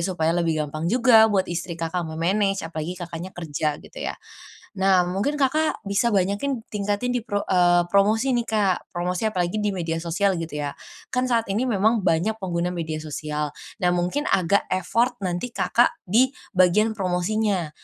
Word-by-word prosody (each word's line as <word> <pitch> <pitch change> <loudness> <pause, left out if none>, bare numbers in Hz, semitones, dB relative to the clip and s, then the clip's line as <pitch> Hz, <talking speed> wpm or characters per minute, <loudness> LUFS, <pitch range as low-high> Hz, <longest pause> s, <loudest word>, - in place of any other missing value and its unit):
supaya 170 -2 0
lebih 165 -3 0
gampang 155 +3 -4
juga 230 0 +6
buat 195 -3 +2
istri 175 0 -4
Kakak 165 0 -3
me-manage 195 +5 0
apalagi 165 +2 -5
Kakaknya 175 +1 -7
kerja 150 -2 -2
gitu - - -12
ya. - - -3 0.7
Nah 190 -2 +4
mungkin 200 +12 -1
Kakak 305 +3 +1
bisa 200 +4 +1
banyakin 205 +7 0
tingkatin 205 +4 -2
di 245 - -1
pro 205 -3 -3
eee, 175 -1 +4
promosi 215 +7 +2
nih 240 - +2
Kak, 205 -4 0
promosi 180 +2 -2
apalagi 185 +1 -1
di 210 - +1
media 165 -4 -3
sosial 185 +4 +1
gitu 155 -2 -5
ya, 145 -1 -3 0.4
kan 255 0 0
saat 230 -2 +2
ini 250 +4 0
memang 220 +1 +2
banyak 180 +4 +1
pengguna 180 -1 -1
media 160 -2 -3
sosial. 150 -1 -4 0.2
Nah 180 -3 +2
mungkin 180 +13 -1
agak 190 +2 +2
effort 230 +7 +1
nanti 185 +7 -3
Kakak 240 +1 +2
di 245 +8 +2 0.2
bagian 210 +4 +3
promosinya, 185 -1 0
185 Hz, 165 wpm, -24 LUFS, 170-220 Hz, 0.7 s, juga